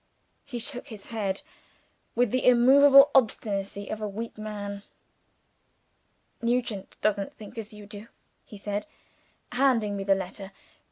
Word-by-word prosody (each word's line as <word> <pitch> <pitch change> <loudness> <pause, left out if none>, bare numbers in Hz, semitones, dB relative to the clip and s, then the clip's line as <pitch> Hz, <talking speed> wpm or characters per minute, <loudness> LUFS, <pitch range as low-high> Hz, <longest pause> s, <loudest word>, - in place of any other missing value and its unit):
He 275 -4 -6
shook 245 +2 -4
his 215 -4 -10
head, 200 -4 -2 0.7
with 240 -2 +2
the 255 - 0
immovable 275 +3 +7
obstinacy 200 -5 0
of 215 - -4
a 210 - -2
weak 225 +3 -6
man. 205 -2 -6 1.6
"Nugent 235 -4 -2
doesn't 200 -2 0
think 215 +2 -11
as 225 -1 -6
you 210 -1 -11
do," 205 +1 -10 0.4
he 210 - -12
said, 205 +4 -4 0.6
handing 245 -5 +2
me 195 - -3
the 195 0 +3
letter. 195 +1 -7
215 Hz, 130 wpm, -27 LUFS, 200-245 Hz, 1.6 s, immovable